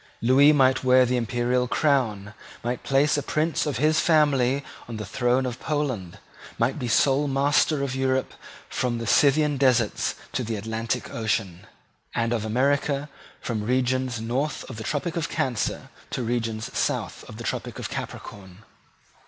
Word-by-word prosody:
Lewis 135 Hz, +5 st, +6 dB
might 130 Hz, -3 st, +3 dB
wear 130 Hz, 0 st, +5 dB
the 125 Hz, +1 st, 0 dB
imperial 120 Hz, +1 st, 0 dB
crown, 115 Hz, -9 st, 0 dB, 0.3 s
might 120 Hz, +1 st, -2 dB
place 140 Hz, +2 st, +2 dB
a -, -, 0 dB
prince 155 Hz, +3 st, 0 dB
of 140 Hz, -6 st, -1 dB
his 155 Hz, +4 st, +3 dB
family 140 Hz, -4 st, +3 dB, 0.2 s
on 115 Hz, -2 st, -6 dB
the 110 Hz, -, -5 dB
throne 125 Hz, +4 st, +1 dB
of 125 Hz, -1 st, -4 dB
Poland, 130 Hz, -, -2 dB, 0.4 s
might 120 Hz, +6 st, 0 dB
be 125 Hz, -, -3 dB
sole 135 Hz, +5 st, +3 dB
master 140 Hz, +1 st, +2 dB
of 135 Hz, -2 st, -2 dB
Europe 130 Hz, 0 st, 0 dB, 0.3 s
from 120 Hz, -2 st, -1 dB
the 115 Hz, -, -4 dB
Scythian 145 Hz, +5 st, +3 dB
deserts 125 Hz, -5 st, +2 dB, 0.2 s
to 125 Hz, -, -2 dB
the 115 Hz, -1 st, -3 dB
Atlantic 110 Hz, +2 st, -3 dB
Ocean, 95 Hz, -5 st, -2 dB, 0.5 s
and 115 Hz, 0 st, 0 dB
of 115 Hz, -3 st, -1 dB
America 140 Hz, +5 st, 0 dB, 0.3 s
from 115 Hz, -3 st, -3 dB
regions 125 Hz, +1 st, 0 dB
north 125 Hz, +7 st, -2 dB
of 120 Hz, -, -8 dB
the 110 Hz, -, -6 dB
Tropic 160 Hz, +6 st, -2 dB
of 165 Hz, -3 st, -2 dB
Cancer 125 Hz, -4 st, -2 dB, 0.2 s
to 125 Hz, -, -3 dB
regions 115 Hz, -2 st, -3 dB
south -, -, -2 dB
of -, -, -9 dB
the -, -, -7 dB
Tropic -, -, -4 dB
of -, -, -5 dB
Capricorn. 95 Hz, 0 st, -8 dB
125 Hz, 160 wpm, -25 LUFS, 115-140 Hz, 0.5 s, Lewis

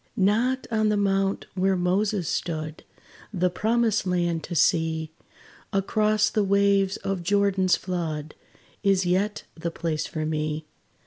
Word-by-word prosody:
Not 230 Hz, +7 st, +2 dB
on 215 Hz, -1 st, +2 dB
the 210 Hz, -, +2 dB
mount 195 Hz, -1 st, +1 dB
where 190 Hz, 0 st, +1 dB
Moses 185 Hz, +1 st, 0 dB
stood, 155 Hz, -2 st, -3 dB, 0.5 s
The 180 Hz, -3 st, +1 dB
promised 220 Hz, +1 st, +1 dB
land 175 Hz, -2 st, 0 dB
to 175 Hz, -, -6 dB
see 160 Hz, -1 st, +2 dB, 0.6 s
Across 215 Hz, +2 st, +2 dB
the 210 Hz, -, +1 dB
waves 200 Hz, -1 st, +2 dB
of 195 Hz, -2 st, -3 dB
Jordan's 195 Hz, 0 st, +2 dB
flood, 160 Hz, -4 st, -4 dB, 0.5 s
Is 195 Hz, -2 st, +2 dB
yet 195 Hz, +4 st, 0 dB
the 170 Hz, +1 st, -4 dB
place 165 Hz, -2 st, -3 dB
for 155 Hz, -3 st, -3 dB
me. 155 Hz, 0 st, -2 dB
190 Hz, 130 wpm, -25 LUFS, 165-205 Hz, 0.6 s, Not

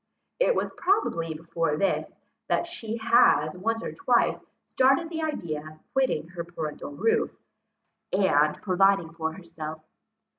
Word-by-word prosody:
It -, -, +3 dB
was -, -, -1 dB
probably 165 Hz, -, +1 dB
before 165 Hz, -1 st, -1 dB
this, 195 Hz, -, 0 dB, 0.4 s
that -, -, +1 dB
she 235 Hz, -10 st, -5 dB
has 220 Hz, -9 st, +4 dB
once 225 Hz, +5 st, -1 dB
or -, -, -4 dB
twice 375 Hz, -, +2 dB, 0.2 s
started 270 Hz, +6 st, +2 dB
the 325 Hz, -1 st, -3 dB
idea 170 Hz, -, -2 dB
of 155 Hz, +1 st, -11 dB, 0.2 s
quitting 260 Hz, -, +1 dB
her 170 Hz, -1 st, -5 dB
parental 160 Hz, -4 st, -6 dB
roof, 210 Hz, +11 st, +1 dB, 0.8 s
and 155 Hz, -6 st, +3 dB
providing 190 Hz, -3 st, +3 dB
for 160 Hz, -1 st, -3 dB
herself. 160 Hz, -3 st, -7 dB
175 Hz, 135 wpm, -27 LUFS, 160-230 Hz, 0.8 s, has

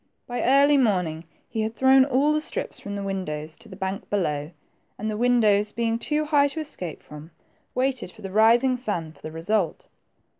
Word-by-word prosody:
By 245 Hz, 0 st, -3 dB
early 280 Hz, +2 st, +5 dB
morning 180 Hz, -9 st, 0 dB, 0.2 s
he 220 Hz, -, -3 dB
had 220 Hz, +1 st, -2 dB
thrown 265 Hz, 0 st, +5 dB
all 280 Hz, +3 st, +2 dB
the 305 Hz, -, +1 dB
strips -, -, -5 dB
from 205 Hz, 0 st, -6 dB
the 200 Hz, -, -4 dB
win 195 Hz, -1 st, -2 dB
dows 150 Hz, 0 st, -4 dB
to 225 Hz, 0 st, -15 dB
the 190 Hz, -, -9 dB
bank 190 Hz, +1 st, -4 dB
below, 150 Hz, -7 st, -1 dB, 0.5 s
and 215 Hz, -, -4 dB
the -, -, -3 dB
windows 215 Hz, -3 st, +3 dB
being 230 Hz, 0 st, 0 dB
too 300 Hz, +4 st, -1 dB
high 290 Hz, -2 st, +4 dB
to 285 Hz, +3 st, -6 dB
escape 185 Hz, -, -6 dB
from, 150 Hz, +1 st, -11 dB, 0.5 s
waited 255 Hz, -6 st, -1 dB
for -, -, -16 dB
the 195 Hz, -, -5 dB
rising 235 Hz, +5 st, +4 dB
sun 190 Hz, -10 st, -3 dB
for -, -, -21 dB
the 155 Hz, -, -7 dB
result. 170 Hz, +2 st, -1 dB
215 Hz, 195 wpm, -25 LUFS, 185-260 Hz, 0.5 s, early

